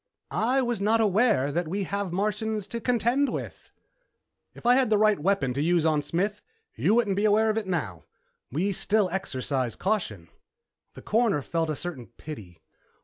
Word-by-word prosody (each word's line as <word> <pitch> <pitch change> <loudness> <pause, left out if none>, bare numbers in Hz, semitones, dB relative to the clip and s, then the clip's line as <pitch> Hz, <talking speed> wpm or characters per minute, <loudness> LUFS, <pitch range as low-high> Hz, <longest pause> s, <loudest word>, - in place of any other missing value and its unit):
"I 255 +4 +1
was 240 -4 -2
not 220 +3 +3
aware 210 - +3
that 170 +3 -1
we 195 +5 -2
have 200 0 -3
Martians 210 +2 -1
to 235 - -4
contend 250 +4 +1
with." - - -7 0.8
"If - - -14
I'd 245 - +6
had 255 -4 +1
the 215 - +4
right 215 -2 +3
weapon 155 -6 +1
to 140 - -2
use 170 +1 +2
on 155 -2 +2
Smith, 195 +8 -2 0.3
you 215 - +2
wouldn't 220 -5 +2
be 205 +2 +1
aware 215 +1 +4
of 215 - -3
it 210 - -8
now. 115 - -3 0.5
We 175 +10 0
still 200 0 +1
exercise 130 - -2
caution." 145 - -2 0.7
The - - -11
Coroner 215 - +1
felt 165 +1 -1
a 155 - -1
certain 140 -6 -6
pity. 110 - -11
195 Hz, 175 wpm, -26 LUFS, 155-220 Hz, 0.8 s, I'd